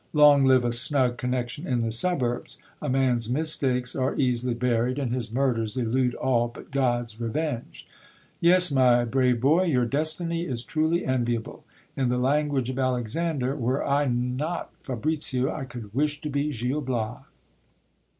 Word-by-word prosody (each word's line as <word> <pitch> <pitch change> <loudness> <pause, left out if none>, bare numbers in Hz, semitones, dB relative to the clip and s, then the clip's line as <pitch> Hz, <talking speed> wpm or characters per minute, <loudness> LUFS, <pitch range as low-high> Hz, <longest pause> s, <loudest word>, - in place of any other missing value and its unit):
Long 145 -2 +6
live 130 -2 +4
a 120 - +1
snug 125 0 +2
connection 125 +5 -3
in 125 -3 0
the 115 -1 -1
suburbs! 120 -2 -1 0.2
a 150 - -3
man's 125 -3 +1
mistakes 130 -3 +1
are 130 0 -1
easily 125 -2 0
buried, 125 +1 0
and 130 -4 -2
his 120 -3 -3
murders 120 -3 -1
elude 125 +1 0
all 120 -2 +1
but 120 - -13
God's 120 -4 -1
revenge. 120 +1 -4 0.5
Yes, 180 0 +6
my 125 -3 +4
brave 125 0 +1
boy, 155 +9 +3
your 130 -8 +2
destiny 165 +5 -1
is 120 -4 -2
truly 160 +4 0
enviable; 120 -3 -2 0.3
in 130 -2 0
the 125 - 0
language 135 -1 0
of 130 - -5
Alexander, 130 +3 -1
were 130 0 -1
I 145 +1 +2
not 125 +7 -2
Fabricio, 135 0 -1
I 135 - -5
could 115 -5 -10
wish 145 +3 0
to 150 -2 -4
be 145 +2 -1
Gil 130 +4 -2
Bias. 125 -4 -3
130 Hz, 155 wpm, -25 LUFS, 120-145 Hz, 0.5 s, Long